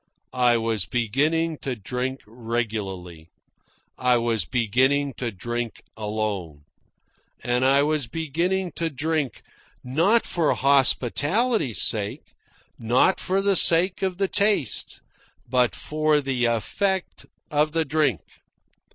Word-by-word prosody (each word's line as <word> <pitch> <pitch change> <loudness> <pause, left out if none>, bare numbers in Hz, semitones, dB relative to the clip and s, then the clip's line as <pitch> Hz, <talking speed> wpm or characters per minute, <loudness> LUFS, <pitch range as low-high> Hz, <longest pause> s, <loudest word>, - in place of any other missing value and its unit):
I 125 -2 +3
was 110 -4 -1
beginning 150 +8 0
to 130 -2 -4
drink 125 +5 -4
regularly. 105 -8 -5 0.7
I 125 -1 +3
was 115 -5 0
beginning 130 +6 +1
to 120 - -2
drink 120 +3 -5
alone. 105 -8 -4 0.8
And 125 +1 0
I 135 +2 +4
was 150 -4 0
beginning 170 +6 -2
to 165 -1 -1
drink, 150 -2 -2 0.4
not 170 - +2
for 165 -4 0
hospitality's 140 - +2
sake, 105 -2 -2 0.5
not 120 +11 +2
for 195 +1 0
the 200 -1 +3
sake 180 +2 +4
of 190 -2 -1
the 195 0 +1
taste, 200 - 0 0.5
but 125 -6 +1
for 155 +6 +1
the 135 -3 -1
effect 180 - -1 0.2
of 150 +1 +1
the 165 -1 +1
drink. 145 - +1
130 Hz, 115 wpm, -24 LUFS, 115-160 Hz, 0.8 s, I